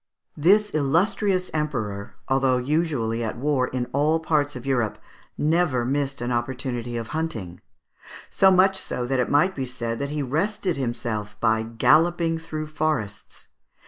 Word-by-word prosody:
This 205 +7 +4
illustrious 185 +6 +1
Emperor, 110 -9 -3
although 135 -1 +2
usually 125 -5 0
at 110 - -3
war 135 -1 +1
in 125 -1 -2
all 150 +4 +2
parts 150 -3 0
of 125 - -8
Europe, 120 -5 0 0.4
never 155 -6 +1
missed 140 0 -1
an 120 +1 -2
opportunity 120 -1 -3
of 115 -1 -5
hunting: 115 - -4 0.7
so 190 - +5
much 190 +1 +4
so 125 - -3
that 130 +1 0
it 125 - +1
might 180 +7 +3
be 135 -5 -4
said 120 -2 -3
that 140 0 -2
he 150 0 -2
rested 180 +6 -1
himself 115 -5 -3
by 110 0 +2
galloping 165 +8 +2
through 155 -1 -5
the 155 - -14
forests. 150 -10 -3
140 Hz, 150 wpm, -24 LUFS, 120-160 Hz, 0.7 s, so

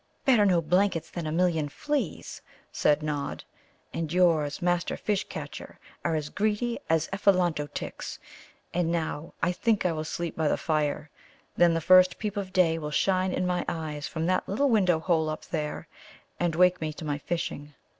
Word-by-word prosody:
"Better 230 -6 +5
no 175 -3 +3
blankets 180 +1 +1
than 170 -3 -4
a - - -2
million 165 -3 +1
fleas," 275 - -3 0.3
said 150 0 +2
Nod; 145 -2 -3 0.5
"and 160 -2 -3
yours, 165 -5 +2
Master 175 -1 0
Fish 210 -2 -1
catcher, - - -8 0.3
are 165 -2 0
as 150 -1 -2
greedy 215 +5 -1
as 160 -1 +2
Ephelanto 180 -7 +2
tics. - - -6 0.6
And 175 -2 +1
now 160 -2 -3
I 170 - +3
think 210 +3 +1
I 180 - +3
will 155 -1 -3
sleep 170 +2 -4
by 160 -1 0
the - - +2
fire, 150 -1 -1 0.4
then 170 -1 +4
the 165 - 0
first 185 +2 +6
peep 210 -1 -3
of 195 -2 -4
day 170 -4 +3
will 150 -1 -4
shine 185 +4 +1
in 185 - -1
my 180 0 0
eyes 150 -3 -4
from 160 +3 -3
that 185 +1 0
little 275 +9 +2
window 185 -7 +4
hole 160 -2 +1
up 155 - -5
there, 150 -2 -4 0.5
and 175 -2 0
wake 180 0 +4
me 155 -1 -2
to 155 - -8
my 145 -1 -2
fishing." 150 -3 -4
170 Hz, 180 wpm, -27 LUFS, 155-185 Hz, 0.6 s, first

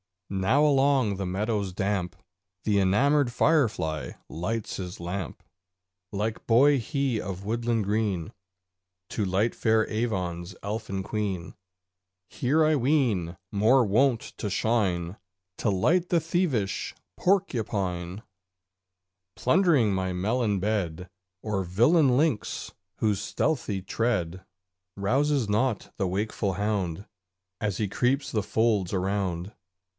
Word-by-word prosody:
Now 105 +10 +3
along 135 -7 +3
the 95 - -3
meadows 100 +1 -1
damp 95 -2 -1 0.5
The 105 -2 +2
enamoured 125 +7 +3
firefly 115 - +1 0.2
lights 105 +6 -3
his 90 -2 -6
lamp. 85 0 -5 0.7
Link 105 +2 -3
boy 135 +5 +5
he 135 -1 -1
of 95 0 -6
woodland 115 0 0
green 100 -4 -1 0.8
To 105 - -1
light 100 +5 +1
fair 110 0 +2
Avon's 90 -6 -2
Elfin 100 -2 -3
Queen; 95 -4 -3 0.8
Here, 150 +6 +2
I 155 -1 +3
ween, 120 - +1
more 110 +6 +4
wont 115 +3 +3 0.2
to 105 - -3
shine 95 -4 0 0.4
To 115 - 0
light 170 - +2
the 170 -2 +3
thievish 155 - -1 0.2
porcupine, 105 - -1 1.1
Plundering 145 - +3
my 95 -1 -1
melon 105 +2 0
bed, 90 -4 -2 0.3
Or 105 -3 -1
villain 125 - +4
lynx, 145 -7 0 0.3
whose 105 -3 +1
stealthy 110 -10 -1
tread 95 -4 -1 0.5
Rouses 130 +4 +1
not 110 +2 0
the 95 - 0
wakeful 100 +1 -1
hound 100 -2 -2 0.5
As 105 -3 -1
he 105 -3 -1
creeps 130 +7 0
the 110 - +1
folds 105 -2 +1
around. 95 0 -1
105 Hz, 110 wpm, -27 LUFS, 95-125 Hz, 1.1 s, boy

